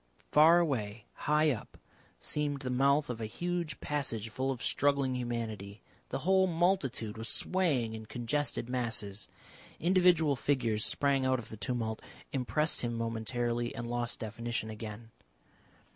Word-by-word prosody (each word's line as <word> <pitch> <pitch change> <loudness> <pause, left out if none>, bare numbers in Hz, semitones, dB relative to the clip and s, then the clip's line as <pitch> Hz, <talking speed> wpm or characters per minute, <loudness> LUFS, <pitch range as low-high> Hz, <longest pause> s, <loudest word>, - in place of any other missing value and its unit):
Far 160 +3 +7
away, 115 -10 -1
high 150 +1 +2
up, 120 - -6 0.4
seemed 145 -2 -1
the 130 - -2
mouth 140 +3 +3
of 115 -2 -4
a 110 - -2
huge 170 +3 -3
passage 115 -7 -2
full 130 +4 -2
of 130 -3 -3
struggling 140 -2 +2
humanity. 115 -5 -4 0.3
The - - -2
whole 190 0 +5
multitude 160 - 0
was 115 - -2
swaying 145 -12 +2
in 110 -1 -7
congested 120 +1 -1
masses. 110 -5 -2 0.5
Individual 175 -4 +4
figures 115 -6 +1
sprang 140 -2 +3
out 130 0 +3
of 120 - -8
the - - -7
tumult, 110 +1 -2 0.3
impressed 150 +4 0
him 120 -1 -2
momentarily, 120 +1 -1
and 120 0 -4
lost 120 0 -1
definition 115 0 -3
again. 110 +1 -8
125 Hz, 140 wpm, -32 LUFS, 115-145 Hz, 0.5 s, Far